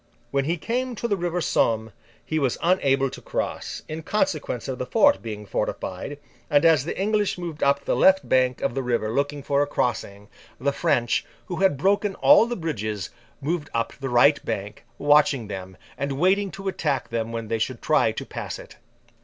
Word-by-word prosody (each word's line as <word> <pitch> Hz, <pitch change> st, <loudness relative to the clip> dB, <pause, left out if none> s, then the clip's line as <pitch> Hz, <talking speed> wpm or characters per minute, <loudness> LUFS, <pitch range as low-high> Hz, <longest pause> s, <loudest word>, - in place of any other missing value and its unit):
When 140 Hz, -1 st, +1 dB
he 170 Hz, +4 st, 0 dB
came 250 Hz, +8 st, -2 dB
up -, -, -10 dB
to 235 Hz, -, -2 dB
the 205 Hz, -, +1 dB
river 175 Hz, -1 st, -2 dB
Somme 110 Hz, -6 st, +1 dB, 0.3 s
he 155 Hz, -, -1 dB
was 135 Hz, -4 st, 0 dB
unable 135 Hz, -7 st, +2 dB
to -, -, -9 dB
cross, -, -, -4 dB
in 155 Hz, +1 st, -5 dB
consequence 155 Hz, -, -1 dB
of 130 Hz, -1 st, -4 dB
the 125 Hz, -, -3 dB
fort 285 Hz, +5 st, +4 dB
being 105 Hz, -2 st, -6 dB
fortified; 100 Hz, +7 st, -3 dB, 0.3 s
and, 145 Hz, +2 st, +4 dB
as 155 Hz, -5 st, +5 dB
the 170 Hz, -, -4 dB
English 210 Hz, 0 st, +1 dB
moved 170 Hz, -4 st, -6 dB
up 140 Hz, 0 st, +2 dB
the -, -, +1 dB
left 190 Hz, 0 st, +4 dB
bank 130 Hz, -1 st, +2 dB
of -, -, 0 dB
the 135 Hz, -, -1 dB
river 120 Hz, -3 st, -1 dB
looking 140 Hz, +1 st, -1 dB
for 140 Hz, 0 st, +1 dB
a 145 Hz, -, +1 dB
crossing, 105 Hz, -7 st, -2 dB, 0.3 s
the 140 Hz, +2 st, +1 dB
French, 135 Hz, -7 st, +1 dB, 0.2 s
who 175 Hz, -, -5 dB
had 190 Hz, -6 st, +3 dB
broken 195 Hz, +5 st, +1 dB
all 290 Hz, -5 st, +6 dB
the 240 Hz, -, -2 dB
bridges, 110 Hz, -, -3 dB, 0.3 s
moved 150 Hz, +1 st, -2 dB
up 115 Hz, -, -1 dB
the 135 Hz, 0 st, -3 dB
right 125 Hz, +4 st, +4 dB
bank, 105 Hz, 0 st, -5 dB
watching 145 Hz, -6 st, +3 dB
them, 95 Hz, -2 st, -7 dB, 0.2 s
and 140 Hz, 0 st, -1 dB
waiting 190 Hz, +7 st, +2 dB
to 195 Hz, +1 st, -7 dB
attack 150 Hz, -7 st, -1 dB
them 115 Hz, -1 st, -2 dB
when 115 Hz, -1 st, -4 dB
they 115 Hz, 0 st, -1 dB
should 120 Hz, +2 st, -2 dB
try -, -, +3 dB
to -, -, -6 dB
pass -, -, -6 dB
it. -, -, -13 dB
140 Hz, 195 wpm, -24 LUFS, 120-175 Hz, 0.3 s, all